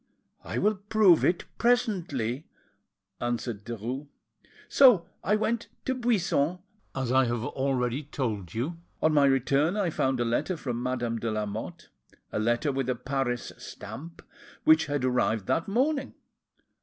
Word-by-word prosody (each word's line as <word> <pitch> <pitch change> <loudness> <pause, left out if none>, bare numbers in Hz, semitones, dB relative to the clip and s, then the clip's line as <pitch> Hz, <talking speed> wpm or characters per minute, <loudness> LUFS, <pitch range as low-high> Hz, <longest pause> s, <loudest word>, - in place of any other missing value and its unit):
"I - - -4
will 210 - +3
prove 205 -3 +4
it 175 - +2
presently," 170 - 0 0.7
answered 120 -3 -3
Derues. 120 +5 -5 0.6
"So 245 -11 +6 0.2
I 210 - +3
went 225 +2 -1 0.2
to 260 - +1
Buisson, 195 - +1 0.4
as 130 -2 -1
I 130 0 +5
have 120 -1 -1
already 130 -1 -1
told 110 - -3
you. 145 +9 -2 0.3
On 155 - +4
my 145 -2 +5
return 140 - +2
I 190 -5 +1
found 130 -3 0
a 120 - +1
letter 145 +10 0
from 120 -5 -3
Madame 120 -2 -1
de 115 - -2
Lamotte, 105 -2 -4 0.4
a - - -1
letter 120 +7 +1
with 135 -1 -2
a 125 - +1
Paris 125 -1 -2
stamp, 165 +4 -9 0.4
which 155 0 +5
had 145 -3 -1
arrived 115 -5 +1
that 165 - 0
morning. 270 +7 0
135 Hz, 145 wpm, -28 LUFS, 120-175 Hz, 0.7 s, So